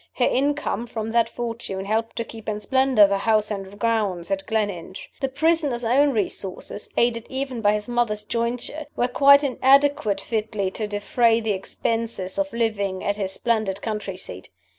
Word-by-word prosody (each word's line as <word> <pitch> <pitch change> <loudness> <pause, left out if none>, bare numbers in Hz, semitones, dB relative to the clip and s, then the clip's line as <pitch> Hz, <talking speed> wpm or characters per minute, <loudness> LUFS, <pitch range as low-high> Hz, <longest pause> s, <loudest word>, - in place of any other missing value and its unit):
Her 245 - +2
income 275 -4 0
from 220 -1 -4
that 235 0 +3
fortune 230 -5 -4
helped 225 +2 -1
to 230 - -2
keep 225 -1 -8
in 210 -1 -2
splendor 260 0 +4
the 200 0 0
house 215 0 +2
and 195 -1 -6
grounds 205 -6 0
at 195 0 -2
Gleninch. 205 -5 -3
The 270 - -1
prisoner's 285 -3 +1
own 270 +5 +4
resources 205 -3 -3
(aided 230 -1 +1
even 265 -3 -3
by 205 -1 +4
his 210 +1 -2
mother's 240 -3 0
jointure) 240 +7 -3
were 245 - +1
quite 280 +3 +6
inadequate 275 -5 +3
fitly 210 -2 -2
to 215 +2 -3
defray 225 +3 +2
the 220 -2 0
expenses 220 +1 -2
of 290 0 0
living 205 -5 -1
at 205 0 -1
his 195 -2 -2
splendid 215 -5 -1
country 210 -4 -4
seat. 95 - -8
225 Hz, 165 wpm, -23 LUFS, 205-245 Hz, -, quite